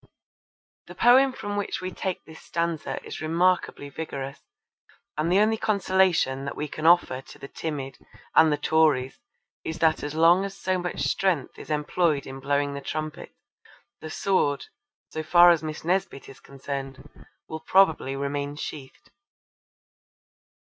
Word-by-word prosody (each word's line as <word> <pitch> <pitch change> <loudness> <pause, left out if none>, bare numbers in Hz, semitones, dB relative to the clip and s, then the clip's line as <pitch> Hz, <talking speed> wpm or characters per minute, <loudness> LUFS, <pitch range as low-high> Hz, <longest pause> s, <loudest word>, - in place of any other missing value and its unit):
The - - -11
poem 260 +3 +5
from 205 -5 -5
which 205 - -2
we 185 0 -5
take 190 -1 -4
this 160 0 -13
stanza 170 -2 -3
is - - -7
remarkably 170 -1 +1
vigorous, 140 -2 -6 0.8
and 155 +3 -1
the 185 - +4
only 215 +2 +3
consolation 190 -10 +1
that 140 - -5
we 150 - -3
can 155 +2 -2
offer 170 -7 +4
to - - -15
the 140 - -9
timid 140 -3 -5 0.3
and 160 - +6
the 150 - +1
Tories 145 -4 +2 0.4
is 160 - -4
that 160 -1 +2
as 145 +1 -5
long 170 +4 +5
as 195 -1 -6
so 185 0 -1
much 180 0 -4
strength 180 -7 0
is - - -11
employed 150 0 0
in 135 0 -8
blowing 140 +1 0
the 140 - -6
trumpet, 155 +2 -6 0.6
the 160 - -8
sword, 155 -6 0 0.5
so 155 - -3
far 175 +2 +7
as 170 - +2
Miss 155 0 -6
Nesbit 180 -5 -1
is 135 - -13
concerned, 135 0 -7 0.4
will 160 - -6
probably 160 -6 +3
remain 140 +1 -3
sheathed. 140 -3 -9
155 Hz, 150 wpm, -25 LUFS, 140-180 Hz, 0.8 s, far